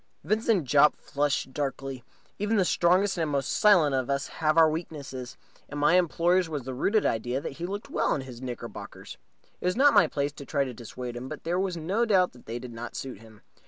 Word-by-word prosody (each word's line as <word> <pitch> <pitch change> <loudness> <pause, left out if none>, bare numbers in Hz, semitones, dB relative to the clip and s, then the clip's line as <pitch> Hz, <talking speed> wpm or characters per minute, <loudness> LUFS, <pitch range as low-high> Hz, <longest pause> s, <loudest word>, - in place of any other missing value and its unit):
Vincent 215 +1 +1
Jopp 145 +2 +5
flushed 140 -2 -1
darkly. 135 -3 -4 0.4
Even 210 +2 +1
the 190 - +3
strongest 180 +2 +2
and 160 -2 0
most 140 -2 -1
silent 175 -9 +5
of 130 -1 -1
us 140 0 -1
have 155 0 +2
our 165 -1 +8
weaknesses, 145 -6 -5 0.3
and 145 - -5
my 145 +4 +4
employer's 175 0 +3
was 145 -4 -4
the 130 +1 -5
rooted 205 - +1
idea 120 +3 0
that 140 +2 -7
he 175 - -3
looked 200 +2 -6
well - - +1
in 135 - -4 0.2
knickerbockers. 125 -2 -8 0.4
It - - -7
was 180 - +1
not 280 +2 +5
my 200 -6 +6
place 145 -1 -2
to 140 -1 -11
try 140 -2 +1
to 130 -2 -5
dissuade 120 +1 -7
him, 125 +2 -6
but - - -8
there 175 +2 0
was 190 -2 -1
no 190 +9 0
doubt 190 -5 +3
that 125 - -19
they 115 +2 -4
did 120 -1 -8
not 115 +1 -7
suit 130 -6 -6
him. 110 -1 -16
150 Hz, 215 wpm, -27 LUFS, 130-180 Hz, 0.4 s, our